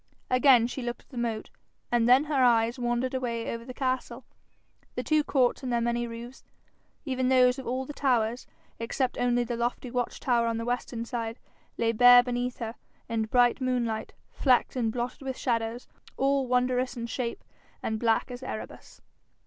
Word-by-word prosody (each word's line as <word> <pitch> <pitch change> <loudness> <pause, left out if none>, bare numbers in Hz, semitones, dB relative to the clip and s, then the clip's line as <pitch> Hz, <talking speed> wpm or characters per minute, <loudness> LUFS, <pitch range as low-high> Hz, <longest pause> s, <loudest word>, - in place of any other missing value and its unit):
Again 255 -2 +6
she 250 +2 -4
looked 240 0 -5
at - - -36
the 255 - -10
moat, 230 -2 -3 0.4
and 240 -1 +3
then 255 +3 +7
her 290 -4 +1
eyes 235 0 +3
wandered 240 +1 -1
away 235 -3 -2
over 230 0 -6
the 255 - -8
castle. 255 -1 -3 0.7
The - - -2
two 310 -1 +2
courts 260 -3 +1
and 255 -2 -3
their 235 - +2
many 235 0 -1
roofs, 235 +2 -9 0.6
even 260 -2 0
those 255 0 +4
of 265 - -8
all 255 +2 -2
the 295 - -7
towers, 245 -4 0 0.3
except 245 +2 -2
only 245 0 +2
the 240 0 -3
lofty 240 +1 -2
watch 245 -1 -2
tower 235 -2 +1
on 230 -1 -1
the 230 - -4
western 240 -1 -3
side, 230 -1 -4 0.4
lay 230 -1 +2
bare 245 +2 +8
beneath 245 0 -2
her, 225 -2 -4 0.3
in 225 -1 -1
bright 245 +3 +3
moonlight, 240 -4 -1 0.2
flecked 255 -2 +2
and 230 -3 0
blotted 245 +4 -4
with 265 -1 -4
shadows, 230 -1 -2 0.3
all 275 -1 +1
wondrous 250 0 +1
in 235 - -3
shape 235 0 -4 0.4
and 220 0 -2
black 230 +2 +1
as 245 +1 -7
Erebus. 255 -4 -8
245 Hz, 180 wpm, -28 LUFS, 235-255 Hz, 0.7 s, bare